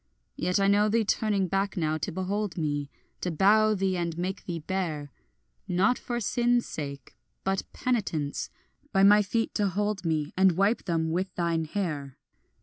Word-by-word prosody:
Yet 180 +2 0
I 195 - +3
know 205 +1 +4
thee 225 +1 +2
turning 205 -2 +1
back 195 +2 -1
now 155 -2 0
to 155 - -3
behold 190 +1 -2
me, 145 -3 -1 0.3
To 180 - -2
bow 210 +6 +4
thee 190 -1 0
and 170 -1 -2
make 185 +3 -3
thee 175 -2 -3
bare, 155 -4 -3 0.6
Not 195 +7 +2
for 240 -1 -3
sin's 240 +2 +1
sake 140 -3 -7 0.3
but 190 0 -2
penitence, 190 - -1 0.4
by 195 -2 +3
my 205 +1 +7
feet 225 +3 -1
to 205 -2 +1
hold 205 0 -1
me, 155 -3 -1
And 190 -1 +5
wipe 200 +6 +1
them 165 -3 0
with 185 +2 -2
thine 170 -2 0
hair. 150 -7 -3
190 Hz, 165 wpm, -28 LUFS, 160-205 Hz, 0.6 s, my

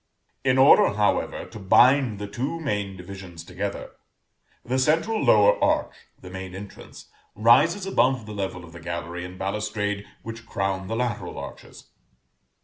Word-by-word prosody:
In 130 -1 +2
order, 130 -6 +6
however, 105 0 0
to 110 - -11
bind 120 +4 +4
the 105 - -5
two 125 +11 -4
main 105 -10 -3
divisions 90 -2 -10
together, 95 +3 -5 0.7
the 130 +2 0
central 165 +11 +1
lower 105 -1 +5
arch - - +1 0.3
(the 90 - -11
main 95 0 -7
entrance) 100 +1 -11 0.3
rises 140 - +4
above 130 - +1
the 105 - -8
level 95 -3 -4
of 80 - -15
the 85 - -10
gallery 85 +1 -5
and 90 +1 -9
balustrade 105 +1 -3 0.2
which 115 +1 -8
crown 95 -2 -2
the 115 - -3
lateral 120 -2 -3
arches. - - -10
105 Hz, 145 wpm, -24 LUFS, 95-125 Hz, 0.7 s, order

